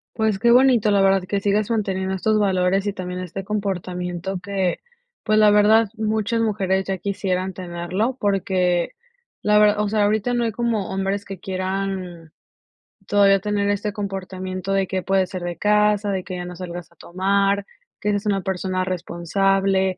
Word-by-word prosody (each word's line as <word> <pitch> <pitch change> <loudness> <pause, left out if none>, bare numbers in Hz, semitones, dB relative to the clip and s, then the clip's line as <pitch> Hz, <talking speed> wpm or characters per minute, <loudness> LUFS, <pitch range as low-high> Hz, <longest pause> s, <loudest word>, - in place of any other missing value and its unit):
Pues, 220 -3 0
qué 235 +3 +4
bonito, 245 -4 +5
la 200 -1 +4
verdad, 195 -1 +3
que 200 +2 -1
sigas 205 +2 0
manteniendo 190 -4 -1
estos 215 +3 +1
valores 190 -1 +1
y 205 - -1
también 180 -1 -5
este 185 +2 -6
comportamiento 185 -2 -3
que, 190 -2 -1 0.4
pues 215 -1 +2
la 210 -1 +6
verdad, 210 +2 +5
muchas 220 +1 0
mujeres 190 -3 0
ya 195 -1 -2
quisieran 190 -1 -2
tenerlo, 180 +7 -3
porque, 185 -3 +1 0.5
la 210 0 +4
ver 210 0 +5
o 210 0 0
sea, 210 0 +1
ahorita 215 +3 +1
no 240 -1 +1
hay 230 - 0
como 225 -3 -1
hombres 195 +1 -2
que 195 -2 -8
quieran 185 -3 -4 0.8
todavía 200 -1 +4
tener 205 0 -1
este 205 +1 -1
comportamiento, 190 -1 -5
de 195 -1 +1
que 185 0 -2
puede 190 +1 +2
ser 185 0 -6
de 175 -1 -4
casa, 210 0 +2
de 190 -2 -2
que 185 -1 -6
ya 180 0 -5
no 180 0 -7
salgas 175 -1 -7
a - - -25
tomar, 195 +2 0 0.3
que 210 - 0
seas 205 +1 -2
una 200 -2 +1
persona 185 0 -2
responsable. 190 +2 0
195 Hz, 170 wpm, -22 LUFS, 185-210 Hz, 0.8 s, la